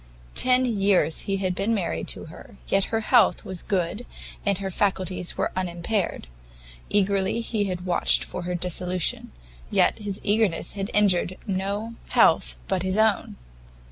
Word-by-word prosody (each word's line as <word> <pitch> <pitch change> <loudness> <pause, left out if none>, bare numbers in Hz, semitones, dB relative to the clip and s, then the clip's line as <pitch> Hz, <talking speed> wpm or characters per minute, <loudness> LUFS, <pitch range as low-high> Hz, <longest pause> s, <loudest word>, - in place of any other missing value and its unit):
Ten 255 0 +4
years 200 -7 +2
he 195 - +1
had 185 -1 -1
been 205 +5 0
married 180 -5 -2
to - - -2
her, 160 +4 -13
yet 195 0 +2
her 225 0 -1
health 240 +1 +3
was 185 -2 -3
good, 195 +4 -2 0.4
and 200 -2 +1
her 195 0 -4
faculties 185 -2 -1
were - - 0
unimpaired; 180 - -2 0.6
eagerly 200 +1 +1
he 220 -3 -1
had 180 -2 -4
watched 180 -1 +2
for - - -6
her 180 +1 -3
dissolution, 180 0 -1 0.4
yet - - +2
his 205 -2 -4
eagerness 205 -4 +1
had 195 0 -4
injured 185 -3 +2
no 200 +3 -3
health - - +4
but 190 -2 0
his 190 +2 -1
own! 220 -2 +2
195 Hz, 150 wpm, -25 LUFS, 180-210 Hz, 0.6 s, Ten